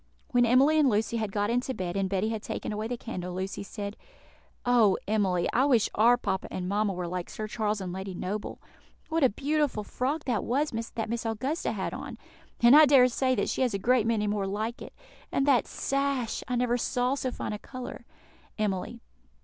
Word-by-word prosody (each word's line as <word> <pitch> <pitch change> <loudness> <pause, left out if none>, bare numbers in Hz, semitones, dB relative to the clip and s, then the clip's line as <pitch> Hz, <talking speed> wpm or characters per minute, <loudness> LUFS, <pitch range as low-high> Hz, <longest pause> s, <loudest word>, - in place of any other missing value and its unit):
When 245 -1 +3
Emily 275 +6 +5
and 290 -3 +5
Lucy 220 +1 0
had 215 -3 -2
got 205 +2 0
into 250 +2 -1
bed, 180 -1 -4
and 195 -1 0
Betty 195 +2 0
had 220 -1 -3
taken - - -4
away 215 +1 -3
the 245 +1 -3
candle, 180 -7 -6
Lucy 190 +1 -4
said, 200 0 -6 0.7
"Oh, 235 -6 +4
Emily! 195 -5 +1
I 255 +3 +4
wish 245 -7 +3
our 235 +3 +5
papa 195 -5 -2
and 180 -1 -4
mamma 205 +1 +1
were 180 -2 -4
like 180 0 -4
Sir 215 - -5
Charles 215 -1 -1
and 185 -2 -5
Lady 190 0 -5
Noble. 200 +4 -4 0.5
What 325 -1 +1
a 260 - +6
beautiful 285 -1 0
frock 275 +8 -2
that 240 -5 -1
was 285 +5 0
that 225 0 -4
Miss 235 +1 -3
Augusta 245 +8 -2
had - - -3
on! - - -7 0.4
and 235 +3 +8
I 305 0 +9
dare 260 -3 +6
say 255 +1 +1
that 200 - 0
she - - -2
has 245 -5 +1
a - - +1
great 235 +2 +2
many 220 -2 +1
more 205 -1 -1
like 215 +4 -3
it. - - -10 0.4
And 275 - +1
that 275 -4 +3
sash! 275 -4 -1
I 250 - -1
never 245 0 +1
saw 250 +2 0
so 270 -2 -2
fine 245 - -4
a 210 - -5
colour." 255 +1 -8 0.5
_Emily. 215 +2 -2
225 Hz, 205 wpm, -28 LUFS, 200-255 Hz, 0.7 s, I